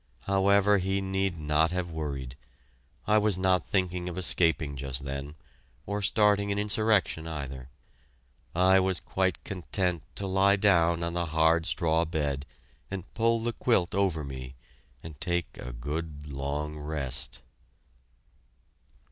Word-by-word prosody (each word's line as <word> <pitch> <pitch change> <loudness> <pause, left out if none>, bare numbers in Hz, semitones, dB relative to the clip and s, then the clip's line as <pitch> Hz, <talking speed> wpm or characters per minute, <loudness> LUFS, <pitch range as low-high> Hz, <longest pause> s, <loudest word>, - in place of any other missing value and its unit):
However, 100 +1 +4
he 95 +1 0
need 95 -2 -1
not 75 +1 +2
have 90 -1 -3
worried 70 -5 -4 0.7
I 105 0 +4
was 105 -3 +1
not 95 -1 +2
thinking 90 -2 -1
of 90 - -7
escaping 80 -5 +1
just 70 0 -4
then 70 +2 -5 0.5
or 105 +1 -2
starting 100 0 +3
an 100 - -1
insurrection 105 -5 +1
either. 70 -5 -6 0.9
I 95 +2 +5
was 95 -1 +1
quite 95 -2 -1
content 90 -1 -1
to 100 - -3
lie 95 +1 +4
down 85 -4 +3
on 85 0 -2
the 85 -1 -1
hard 80 +1 +3
straw 80 0 +2
bed 75 -3 -2 0.4
and 95 -1 -7
pull 115 0 +2
the 120 0 -1
quilt 100 -8 +1
over 95 -6 +1
me 65 -1 -7 0.5
and 80 -4 -10
take 85 -1 -1
a 60 - -6
good 75 +4 -5
long 75 +2 -3
rest. 75 -4 -4
85 Hz, 135 wpm, -28 LUFS, 75-95 Hz, 0.9 s, I